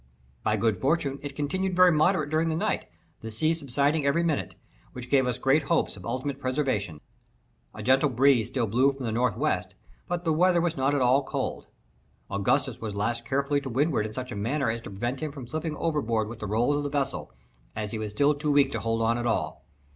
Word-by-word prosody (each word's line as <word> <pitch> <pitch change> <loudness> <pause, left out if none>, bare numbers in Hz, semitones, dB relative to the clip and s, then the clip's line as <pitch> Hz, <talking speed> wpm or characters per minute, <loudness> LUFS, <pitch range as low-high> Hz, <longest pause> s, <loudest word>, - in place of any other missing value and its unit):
By - - +1
good 110 -5 0
fortune 140 -1 0
it 145 -1 -7
continued 185 +6 -1
very 180 0 +7
moderate 155 -1 +2
during 160 +1 +2
the 160 - 0
night, 165 - -1 0.3
the 115 - -6
sea 155 +9 +1
subsiding 145 0 0
every 140 +5 +2
minute, 160 -4 -1 0.4
which 125 0 -9
gave 135 -2 +4
us 125 -1 -1
great 135 +4 +3
hopes 170 - +1
of 95 -3 -9
ultimate 135 +1 -3
preservation. 130 - -1 0.7
A - - -7
gentle 135 +3 +4
breeze 130 -2 +3
still 125 -4 -1
blew 125 +6 +3
from 135 -1 -8
the 115 - -1
N. 125 +3 +2
W., 100 - 0 0.5
but 175 -1 -2
the 160 -2 +1
weather 175 +2 +4
was 170 -1 0
not 135 +2 +1
at 140 - +1
all 130 +3 +4
cold. - - -4 0.6
Augustus 100 0 0
was 110 -3 -4
lashed 115 +3 -2
carefully 140 +2 0
to 135 - -6
windward 130 -3 +1
in 110 - -10
such 130 +2 -5
a - - -4
manner 120 +5 0
as 115 0 -4
to - - -9
prevent 120 +7 -3
him 155 0 -3
from 140 -4 -8
slipping 155 +3 -4
overboard 120 -9 0
with 120 -1 -8
the 105 - -4
rolls 120 +8 +1
of 145 - -2
the 145 - -2
vessel, 140 -2 -2 0.4
as 105 -1 -4
he 110 - -4
was 110 -1 -3
still 145 +7 +3
too 150 +1 -3
weak 140 -1 +4
to - - -2
hold 115 0 -1
on 115 +1 +1
at 120 - -1
all. 110 - -2
135 Hz, 225 wpm, -27 LUFS, 115-150 Hz, 0.7 s, very